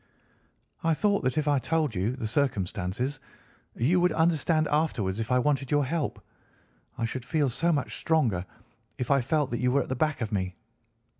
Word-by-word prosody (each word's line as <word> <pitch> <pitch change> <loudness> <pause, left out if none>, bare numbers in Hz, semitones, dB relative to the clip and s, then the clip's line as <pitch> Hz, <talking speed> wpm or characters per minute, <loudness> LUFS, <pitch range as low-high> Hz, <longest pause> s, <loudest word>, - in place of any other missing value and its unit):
"I 165 -1 +3
thought 205 +1 +1
that 130 +2 0
if 155 -1 +1
I 145 -2 +3
told 150 +1 0
you 100 +7 -1
the 125 -4 -5
circumstances 110 +1 -1 0.6
you 160 +10 +2
would 180 0 +3
understand 160 -1 +2
afterwards 115 -11 0
if 115 +2 -3
I 125 - +4
wanted 135 0 +1
your 145 -1 +2
help. 155 +1 -2 0.8
I 115 - 0
should 120 +2 -4
feel 145 0 +1
so 165 +8 +1
much 145 -5 -1
stronger 125 - +1 0.5
if 125 - -2
I 140 -1 +4
felt 145 +2 0
that 120 - -1
you 125 +1 +2
were 140 0 +3
at - - -12
the 130 - -1
back 155 +3 0
of 110 -1 -2
me." 95 -3 -2
135 Hz, 190 wpm, -28 LUFS, 115-155 Hz, 0.8 s, I